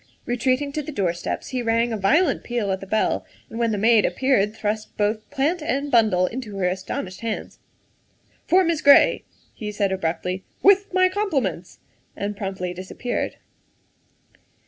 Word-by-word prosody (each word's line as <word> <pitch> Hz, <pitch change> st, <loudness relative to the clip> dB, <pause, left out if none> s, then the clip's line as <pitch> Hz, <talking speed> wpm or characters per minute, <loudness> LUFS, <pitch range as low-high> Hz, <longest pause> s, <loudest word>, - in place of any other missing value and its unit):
Retreating 255 Hz, +3 st, 0 dB
to 305 Hz, -, -2 dB
the 300 Hz, -, -7 dB
doorsteps, 175 Hz, -, -2 dB
he 255 Hz, -2 st, -2 dB
rang 230 Hz, 0 st, +1 dB
a -, -, 0 dB
violent 275 Hz, -, +2 dB
peal 235 Hz, -5 st, -2 dB
at 190 Hz, -, -1 dB
the 195 Hz, -, -9 dB
bell, 215 Hz, +3 st, 0 dB, 0.3 s
and 225 Hz, -, -6 dB
when 230 Hz, -1 st, +1 dB
the 210 Hz, -, -1 dB
maid 225 Hz, +1 st, +4 dB
appeared 210 Hz, 0 st, +1 dB
thrust 215 Hz, 0 st, -3 dB
both 215 Hz, +1 st, -1 dB
plant 310 Hz, +6 st, 0 dB
and 285 Hz, -1 st, -2 dB
bundle 215 Hz, -6 st, +4 dB
into 225 Hz, -1 st, -5 dB
her 190 Hz, -, 0 dB
astonished 185 Hz, 0 st, -4 dB
hands. 225 Hz, -2 st, -5 dB, 0.4 s
" -, -, -39 dB
For 375 Hz, +1 st, +5 dB
Miss 330 Hz, -3 st, 0 dB
Gray," 285 Hz, -1 st, +6 dB, 0.3 s
he 210 Hz, -1 st, -6 dB
said 205 Hz, -2 st, 0 dB
abruptly, 180 Hz, +1 st, -2 dB
" -, -, -38 dB
with 400 Hz, +1 st, +5 dB
my 370 Hz, 0 st, +4 dB
com 405 Hz, +2 st, -2 dB
pliments," 190 Hz, -, -2 dB, 0.4 s
and 205 Hz, +1 st, -3 dB
promptly 190 Hz, -3 st, -4 dB
disappeared. 190 Hz, +7 st, -4 dB
225 Hz, 170 wpm, -23 LUFS, 195-275 Hz, 0.4 s, Gray